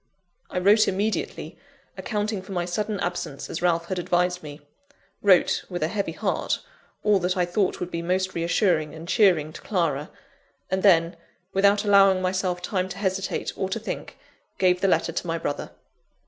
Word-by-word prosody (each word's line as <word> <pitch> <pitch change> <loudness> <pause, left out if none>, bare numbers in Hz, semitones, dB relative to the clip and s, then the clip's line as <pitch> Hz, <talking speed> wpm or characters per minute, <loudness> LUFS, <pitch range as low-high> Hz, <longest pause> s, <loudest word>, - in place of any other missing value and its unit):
I - - -5
wrote 205 +4 +5
immediately, 205 +3 -2 0.4
accounting 210 -2 -2
for 190 +1 -9
my 175 -1 -1
sudden 205 +3 -2
absence 175 -5 -4
as 165 - -4
Ralph 170 -1 +2
had 185 +1 -3
advised 180 +1 0
me 145 -1 -10 0.6
wrote, 190 -3 +4
with 175 -3 -3
a 155 - 0
heavy 200 +1 -2
heart, - - -1 0.5
all 210 -2 +4
that 180 +1 -1
I 180 - +2
thought 185 +2 0
would 180 0 -4
be 170 - -3
most 185 +2 -1
reassuring 170 -2 +1
and 160 +1 -9
cheering 175 -7 +3
to - - -10
Clara; 165 -8 -1 0.6
and 190 0 +1
then, 170 -3 +4 0.4
without 200 +2 +3
allowing 195 -2 +6
myself 185 -1 -1
time 185 0 -1
to 185 - -7
hesitate 190 -1 -2
or 190 - -2
to 215 +4 -2
think, 225 - -6 0.4
gave 180 -1 +3
the 195 - +3
letter 165 -2 +2
to 175 - -4
my 165 0 -1
brother. 145 -3 -4
185 Hz, 175 wpm, -25 LUFS, 170-195 Hz, 0.6 s, allowing